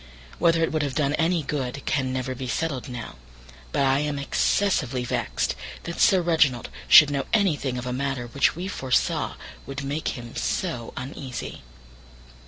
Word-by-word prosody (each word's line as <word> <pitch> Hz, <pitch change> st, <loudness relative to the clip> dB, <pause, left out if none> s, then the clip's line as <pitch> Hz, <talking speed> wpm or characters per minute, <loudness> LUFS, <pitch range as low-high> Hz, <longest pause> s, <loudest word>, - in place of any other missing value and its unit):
Whether 165 Hz, -1 st, +4 dB
it -, -, +1 dB
would 155 Hz, -, 0 dB
have 140 Hz, -3 st, -2 dB
done 145 Hz, -2 st, +1 dB
any 165 Hz, +1 st, +1 dB
good 140 Hz, -1 st, -3 dB
can 135 Hz, -4 st, 0 dB
never 130 Hz, 0 st, -2 dB
be 130 Hz, 0 st, -6 dB
settled 135 Hz, -1 st, -2 dB
now, 120 Hz, -, -7 dB, 0.5 s
but -, -, +1 dB
I 135 Hz, 0 st, +3 dB
am 150 Hz, -1 st, -1 dB
excessively 140 Hz, -3 st, +1 dB
vexed -, -, -1 dB, 0.3 s
that 170 Hz, -, -6 dB
Sir 185 Hz, -3 st, +5 dB
Reginald 150 Hz, -8 st, +2 dB, 0.2 s
should 150 Hz, -2 st, +9 dB
know 140 Hz, -1 st, -1 dB
anything 150 Hz, -, +2 dB
of 125 Hz, -, -4 dB
a 125 Hz, -, -2 dB
matter 135 Hz, -1 st, -2 dB
which 130 Hz, +4 st, +1 dB
we 180 Hz, +3 st, -4 dB
foresaw 130 Hz, -9 st, 0 dB, 0.3 s
would 135 Hz, +1 st, -5 dB
make 145 Hz, +2 st, -2 dB
him 120 Hz, -1 st, -9 dB
so 125 Hz, -11 st, -2 dB
uneasy. 130 Hz, -1 st, -6 dB
140 Hz, 165 wpm, -25 LUFS, 130-160 Hz, 0.5 s, should